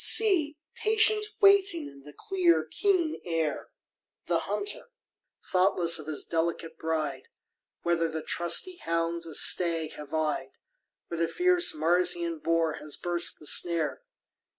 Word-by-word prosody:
See, 340 Hz, -9 st, +5 dB, 0.2 s
patient 435 Hz, -1 st, +5 dB
waiting 395 Hz, -4 st, +4 dB
in 140 Hz, 0 st, -14 dB
the 150 Hz, +2 st, -13 dB
clear 350 Hz, -, 0 dB
keen 370 Hz, -6 st, -1 dB
air, 165 Hz, -3 st, -3 dB, 0.6 s
The -, -, 0 dB
hunter, 445 Hz, +5 st, -4 dB, 0.6 s
thoughtless 180 Hz, -3 st, +2 dB
of 155 Hz, -, -10 dB
his 155 Hz, -2 st, -3 dB
delicate 165 Hz, 0 st, -3 dB
bride, 155 Hz, -4 st, -4 dB, 0.6 s
Whether 170 Hz, -1 st, 0 dB
the 160 Hz, -1 st, -6 dB
trusty 175 Hz, -, 0 dB
hounds 165 Hz, -, -3 dB
a 160 Hz, -, -7 dB
stag 165 Hz, -3 st, +2 dB
have 150 Hz, -1 st, -11 dB
eyed, 155 Hz, -1 st, -3 dB, 0.6 s
Or 170 Hz, -, -4 dB
the 165 Hz, 0 st, 0 dB
fierce 360 Hz, -, +1 dB
Marsian 170 Hz, +1 st, 0 dB
boar 165 Hz, -1 st, -1 dB
has 150 Hz, 0 st, -5 dB
burst 175 Hz, -1 st, +1 dB
the 150 Hz, -, -14 dB
snare. 160 Hz, -4 st, +1 dB
170 Hz, 130 wpm, -27 LUFS, -, 0.6 s, See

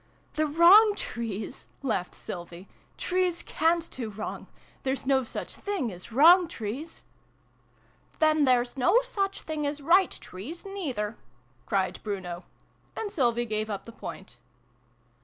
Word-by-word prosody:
" -, -, -36 dB
The 310 Hz, -1 st, +1 dB
wrong 375 Hz, +8 st, +7 dB
trees! 225 Hz, -, -5 dB
" -, -, -38 dB
laughed 205 Hz, -9 st, -1 dB
Sylvie. 175 Hz, +1 st, -8 dB, 0.2 s
" -, -, -36 dB
Trees 365 Hz, -1 st, +1 dB
cant 330 Hz, +1 st, +1 dB
do 235 Hz, -4 st, -5 dB
wrong! 215 Hz, +1 st, -6 dB, 0.3 s
There's 265 Hz, 0 st, -2 dB
no 265 Hz, -1 st, +3 dB
such 230 Hz, -, -6 dB
things 380 Hz, -, -2 dB
as 180 Hz, +6 st, -10 dB
wrong 335 Hz, +8 st, +7 dB
trees! 265 Hz, +4 st, -6 dB, 0.4 s
" -, -, -37 dB
" -, -, -34 dB
Then 310 Hz, -1 st, +4 dB
there's 250 Hz, -1 st, +2 dB
no 360 Hz, -, +4 dB
such 395 Hz, -6 st, -2 dB
things 305 Hz, -2 st, -2 dB
as 290 Hz, +1 st, -3 dB
right 350 Hz, +6 st, +4 dB
trees, 265 Hz, -, -9 dB
neither! 265 Hz, -, -3 dB, 0.2 s
" 120 Hz, 0 st, -36 dB
cried 190 Hz, -2 st, 0 dB
Bruno. 185 Hz, -4 st, -5 dB, 0.5 s
And 420 Hz, -2 st, -3 dB
Sylvie 240 Hz, -6 st, +1 dB
gave 215 Hz, -1 st, -2 dB
up 200 Hz, -2 st, -4 dB
the 230 Hz, -, -9 dB
point. 195 Hz, -, -9 dB
265 Hz, 155 wpm, -28 LUFS, 210-340 Hz, 0.5 s, wrong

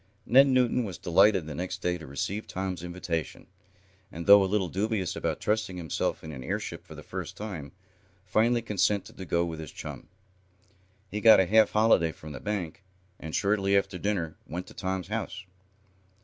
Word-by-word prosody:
Ned 135 Hz, +4 st, +6 dB
Newton 125 Hz, -2 st, +2 dB
was 95 Hz, -6 st, -5 dB
delighted 95 Hz, 0 st, +4 dB
the 75 Hz, -, -6 dB
next 90 Hz, +5 st, -4 dB
day 90 Hz, 0 st, +1 dB
to 80 Hz, -, -10 dB
receive 95 Hz, +10 st, -3 dB
Tom's 95 Hz, -2 st, -4 dB
invitation, 85 Hz, -3 st, -4 dB, 0.7 s
and, 85 Hz, +1 st, -7 dB
though 100 Hz, 0 st, +8 dB
a 95 Hz, -, -1 dB
little 100 Hz, -3 st, +1 dB
dubious 100 Hz, +1 st, -1 dB
about -, -, -2 dB
trusting 105 Hz, -4 st, -1 dB
himself 80 Hz, -4 st, -2 dB
in 80 Hz, -, -7 dB
an 65 Hz, -4 st, -8 dB
airship -, -, -4 dB
for -, -, -10 dB
the -, -, -10 dB
first -, -, -6 dB
time, 95 Hz, -9 st, -6 dB, 0.5 s
finally 115 Hz, +5 st, +2 dB
consented 105 Hz, -2 st, 0 dB
to 95 Hz, -, -7 dB
go 85 Hz, 0 st, +1 dB
with 80 Hz, -2 st, -5 dB
his 80 Hz, -2 st, -7 dB
chum. -, -, -8 dB, 1.0 s
He 105 Hz, -, -3 dB
got 110 Hz, -2 st, +8 dB
a 95 Hz, -, +4 dB
half 110 Hz, +3 st, +5 dB
holiday 105 Hz, -7 st, +3 dB
from 75 Hz, 0 st, -11 dB
the -, -, -7 dB
bank, 100 Hz, -3 st, -4 dB, 0.4 s
and, 80 Hz, 0 st, -6 dB
shortly 100 Hz, -1 st, +2 dB
after 95 Hz, -2 st, -1 dB
dinner 90 Hz, -5 st, -1 dB
went 90 Hz, +2 st, -5 dB
to -, -, -14 dB
Tom's 95 Hz, 0 st, -3 dB
house. 105 Hz, -3 st, -4 dB
95 Hz, 180 wpm, -28 LUFS, 85-105 Hz, 1.0 s, though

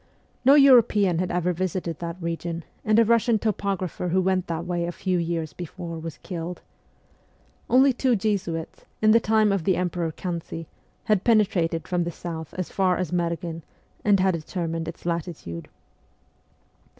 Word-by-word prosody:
No 270 Hz, +3 st, +7 dB
European 225 Hz, -, +5 dB
had 180 Hz, 0 st, -1 dB
ever 180 Hz, 0 st, 0 dB
visited 175 Hz, -2 st, -3 dB
that 170 Hz, 0 st, -5 dB
region, 170 Hz, 0 st, -4 dB, 0.2 s
and 215 Hz, 0 st, +3 dB
a 230 Hz, -, +6 dB
Russian 230 Hz, 0 st, +3 dB
topographer 195 Hz, -4 st, -2 dB
who 185 Hz, +2 st, +2 dB
went 185 Hz, -1 st, +1 dB
that 165 Hz, 0 st, -3 dB
way 175 Hz, -1 st, -1 dB
a -, -, -2 dB
few 180 Hz, 0 st, -1 dB
years 165 Hz, -2 st, -2 dB
before 170 Hz, -1 st, -7 dB
was 165 Hz, 0 st, -7 dB
killed. 175 Hz, -1 st, -5 dB, 1.1 s
Only 260 Hz, +2 st, +5 dB
two 250 Hz, 0 st, +2 dB
Jesuits, 190 Hz, -6 st, -2 dB
in 215 Hz, 0 st, +5 dB
the 230 Hz, -, +6 dB
time 215 Hz, -1 st, +3 dB
of 195 Hz, -4 st, 0 dB
the 185 Hz, +2 st, +2 dB
emperor 175 Hz, -2 st, -1 dB
Kan 170 Hz, +1 st, -4 dB
si, 165 Hz, 0 st, -7 dB, 0.4 s
had 210 Hz, -4 st, +2 dB
penetrated 185 Hz, -7 st, +2 dB
from 180 Hz, -1 st, 0 dB
the 170 Hz, -, -3 dB
south 160 Hz, -2 st, -7 dB
as 185 Hz, -2 st, -4 dB
far 185 Hz, -2 st, +2 dB
as 180 Hz, -4 st, -2 dB
Merghen, 170 Hz, -1 st, -2 dB, 0.4 s
and 205 Hz, -2 st, +4 dB
had 190 Hz, 0 st, +3 dB
determined 165 Hz, 0 st, -3 dB
its 165 Hz, -, -8 dB
latitude. 160 Hz, -, -4 dB
180 Hz, 160 wpm, -25 LUFS, 165-200 Hz, 1.1 s, No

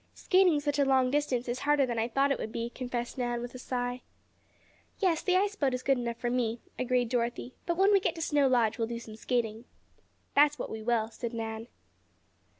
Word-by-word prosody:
"Skating 365 Hz, -5 st, +4 dB
such 290 Hz, 0 st, -1 dB
a -, -, +5 dB
long 260 Hz, -2 st, +3 dB
distance 270 Hz, -4 st, 0 dB
is 245 Hz, +1 st, -2 dB
harder 290 Hz, -1 st, +3 dB
than 240 Hz, -2 st, -2 dB
I 225 Hz, -, +1 dB
thought 275 Hz, +3 st, +2 dB
it -, -, 0 dB
would 220 Hz, -, -4 dB
be," 235 Hz, +1 st, -3 dB
confessed 245 Hz, 0 st, -4 dB
Nan, 240 Hz, -1 st, -1 dB
with 240 Hz, 0 st, -6 dB
a 255 Hz, -, -8 dB
sigh. 245 Hz, 0 st, -3 dB, 1.0 s
"Yes, 355 Hz, -6 st, +1 dB
the 365 Hz, -, +1 dB
ice 405 Hz, +2 st, +1 dB
boat 275 Hz, -9 st, +1 dB
is 250 Hz, -, -6 dB
good 270 Hz, -2 st, +2 dB
enough 235 Hz, -1 st, -3 dB
for 240 Hz, 0 st, -2 dB
me," 235 Hz, -2 st, 0 dB, 0.2 s
agreed 250 Hz, -1 st, +1 dB
Dorothy. 240 Hz, +1 st, -2 dB
"But 340 Hz, -1 st, 0 dB
when 390 Hz, +2 st, +5 dB
we 395 Hz, -, +6 dB
get 375 Hz, -, -1 dB
to 325 Hz, -, -6 dB
Snow 290 Hz, -3 st, +3 dB
Lodge 235 Hz, -3 st, +2 dB
we'll 225 Hz, -, 0 dB
do 235 Hz, 0 st, -4 dB
some 220 Hz, -2 st, -10 dB
skating." 225 Hz, -1 st, -2 dB, 0.7 s
"That's 295 Hz, +1 st, +5 dB
what -, -, -5 dB
we 220 Hz, -, -5 dB
will," 225 Hz, -1 st, +1 dB
said 235 Hz, +1 st, -5 dB
Nan. 225 Hz, 0 st, -4 dB
250 Hz, 220 wpm, -30 LUFS, 235-285 Hz, 1.0 s, we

